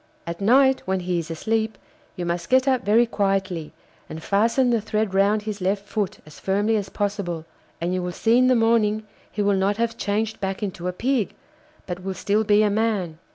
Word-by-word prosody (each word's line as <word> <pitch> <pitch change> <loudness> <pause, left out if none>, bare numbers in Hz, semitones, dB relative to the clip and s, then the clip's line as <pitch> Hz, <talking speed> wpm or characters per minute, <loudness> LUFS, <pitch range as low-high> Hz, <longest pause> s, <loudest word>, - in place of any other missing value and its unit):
At 170 +2 -6
night, 265 +5 +4
when 190 0 0
he 180 -1 -1
is 165 -1 -6
asleep, 220 +5 -1 0.4
you 175 - -4
must 170 0 -3
get 260 +1 +4
up 260 -2 +2
very 220 +4 +4
quietly, 195 -7 -1 0.4
and 160 0 -7
fasten 230 +5 +2
the 230 -2 +2
thread 215 -1 -1
round 200 +2 +3
his 210 -2 -5
left 195 +2 -1
foot 205 -2 -2
as 155 - -14
firmly 205 +3 +1
as 200 -3 -2
possible; 195 -6 -3 0.3
and 170 +2 -1
you 185 - -1
will 180 0 -3
see 225 +6 +2
in 255 - +4
the 255 - +4
morning 225 -2 +2 0.3
he 205 - -1
will 200 0 +3
not 195 +2 +1
have 230 0 -1
changed 215 +2 -1
back 195 +1 -3
into 180 -3 -4
a - - 0
Pig, 240 +3 -1 0.5
but 180 -1 -5
will 190 0 -4
still 210 +3 +1
be 210 0 +4
a 210 - +3
man. 200 -7 -1
205 Hz, 205 wpm, -23 LUFS, 185-225 Hz, 0.5 s, night